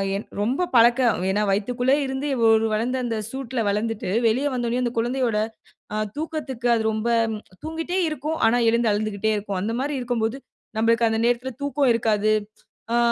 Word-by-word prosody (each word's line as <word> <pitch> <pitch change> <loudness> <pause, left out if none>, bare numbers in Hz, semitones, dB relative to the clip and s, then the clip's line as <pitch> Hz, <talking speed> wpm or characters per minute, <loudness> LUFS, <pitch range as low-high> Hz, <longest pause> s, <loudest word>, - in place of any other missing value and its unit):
என் 200 - -4
ரொம்ப 255 - +1
பழக்க 240 +2 +6 0.3
ஏன்னா 205 +2 +1
வயித்துக்குள்ளருந்து 265 +7 0 0.2
ஒரு 225 0 +4
வளர்ந்த, 240 +4 0
அந்த 230 -2 -2
சூட்‌ல 260 -1 -4
வளந்துட்டு 210 +1 -1 0.2
வெளிய 245 +6 +2
வந்த 245 -2 -1
உடனே 245 +2 0
அந்த 240 - 0
குழந்தையோட, 240 -1 0 0.6
அ - - -1 0.2
தூக்கத்துக்கு 295 -6 -4
அது 225 - +1
ரொம்ப 220 +1 -2 0.5
தூங்கிட்டே 325 +3 -3
இருக்கும். 305 +1 -3
ஆனா 235 +2 +3
எழுந்து 235 0 +2
அழுந்துகிட்டே 215 0 -1
இருக்கும். 200 -2 -3
அந்த 220 +4 -2
மாரி 285 +2 -2
இருக்கம் 245 -2 -2
போது, 225 +4 -1 0.4
நமபளுக்கு 230 +1 +3
அந்த 220 0 0
நேரத்துல 245 +2 0
தூக்கம் 285 -2 +2
இருக்காது. 215 -2 +2 0.6
ஆ, - - +3
235 Hz, 160 wpm, -23 LUFS, 220-265 Hz, 0.6 s, பழக்க